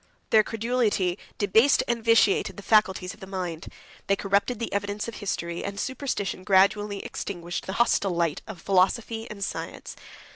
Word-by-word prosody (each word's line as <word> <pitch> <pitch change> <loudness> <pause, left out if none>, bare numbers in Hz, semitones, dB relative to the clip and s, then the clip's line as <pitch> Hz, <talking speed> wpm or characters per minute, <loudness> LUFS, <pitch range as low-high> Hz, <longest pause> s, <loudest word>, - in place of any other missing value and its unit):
Their 220 - +7
credulity 220 -5 0 0.2
debased 220 +7 +4
and 235 -1 -1
vitiated 230 -3 +3
the 205 - -8
faculties 190 -4 +2
of 215 - -17
the 190 - -9
mind: 180 -3 -5 0.4
they 195 - +3
corrupted 200 +5 0
the 230 -2 -4
evidence 205 +1 -2
of 230 - -6
history; 170 -4 -3
and 200 0 -5
superstition 260 -8 -3
gradually 200 +1 +2
extinguished 175 -2 -5
the 190 - -3
hostile 205 -3 +2
light 170 -3 0
of 215 -5 -8
philosophy 220 +5 +1
and 200 -2 -6
science. - - -5
200 Hz, 155 wpm, -26 LUFS, 190-225 Hz, 0.4 s, Their